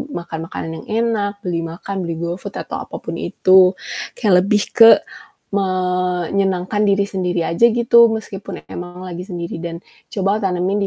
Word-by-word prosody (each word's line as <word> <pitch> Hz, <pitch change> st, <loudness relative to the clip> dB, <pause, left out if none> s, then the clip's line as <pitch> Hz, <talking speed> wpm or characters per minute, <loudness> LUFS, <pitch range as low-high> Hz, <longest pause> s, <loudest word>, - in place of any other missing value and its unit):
makan 170 Hz, -2 st, -5 dB
makanan 165 Hz, -, -6 dB
yang -, -, -18 dB, 0.2 s
enak, 205 Hz, -2 st, -2 dB
beli 175 Hz, -2 st, -1 dB
makan, 185 Hz, +4 st, -5 dB
beli 165 Hz, -, -3 dB
GoFood, 170 Hz, +2 st, -5 dB
atau -, -, -6 dB
apapun -, -, -6 dB
itu. 185 Hz, 0 st, +4 dB, 0.4 s
Kayak 210 Hz, -5 st, +2 dB
lebih 205 Hz, +1 st, +2 dB
ke 225 Hz, -1 st, +9 dB, 0.6 s
menyenangan 185 Hz, +1 st, 0 dB
diri 200 Hz, 0 st, +2 dB
sendiri 180 Hz, -4 st, -1 dB
aja 170 Hz, +8 st, +4 dB
gitu, 235 Hz, 0 st, +5 dB
meskipun 210 Hz, -3 st, -6 dB
emang 175 Hz, +1 st, -7 dB
lagi 180 Hz, -1 st, -6 dB
sendiri, 170 Hz, -4 st, -5 dB
dan 170 Hz, -1 st, -5 dB, 0.3 s
coba 200 Hz, +1 st, 0 dB
tanamin 190 Hz, +2 st, 0 dB
185 Hz, 145 wpm, -19 LUFS, 175-200 Hz, 0.6 s, ke